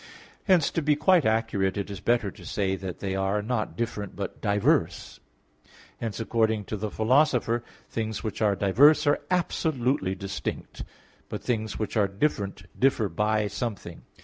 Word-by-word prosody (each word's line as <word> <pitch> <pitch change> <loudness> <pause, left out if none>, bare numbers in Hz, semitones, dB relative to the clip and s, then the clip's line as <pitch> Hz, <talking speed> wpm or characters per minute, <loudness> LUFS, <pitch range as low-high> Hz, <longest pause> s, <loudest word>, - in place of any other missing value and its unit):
Hence, 180 -7 +4
to 165 - -1
be 150 0 +3
quite 160 - +4
accurate, 110 -4 0
it 100 0 -3
is 100 - -6
better 115 -4 +1
to - - -15
say 95 -2 -1
that 95 -2 -7
they 95 -1 -2
are, 95 +2 0
not 110 -1 -2
different, 110 -4 -3
but 100 - -6
diverse. 105 - +1 0.8
Hence, 115 -2 -4
according 110 -2 +1
to 110 - -4
the 105 +1 -3
Philosopher 120 +1 +2
(Metaph. - - -20 0.2
x), - - -30
"things 110 -2 -3
which 110 0 -4
are 105 -2 +3
diverse 130 +13 +5
are 145 0 +3
absolutely 135 - 0
distinct, 100 0 -5 0.5
but - - -5
things 110 -3 -2
which 110 0 -3
are 105 -2 +4
different 100 -2 -2 0.2
differ 125 -6 +2
by 105 +4 +1
something." 100 -4 -5
110 Hz, 165 wpm, -26 LUFS, 100-125 Hz, 0.8 s, diverse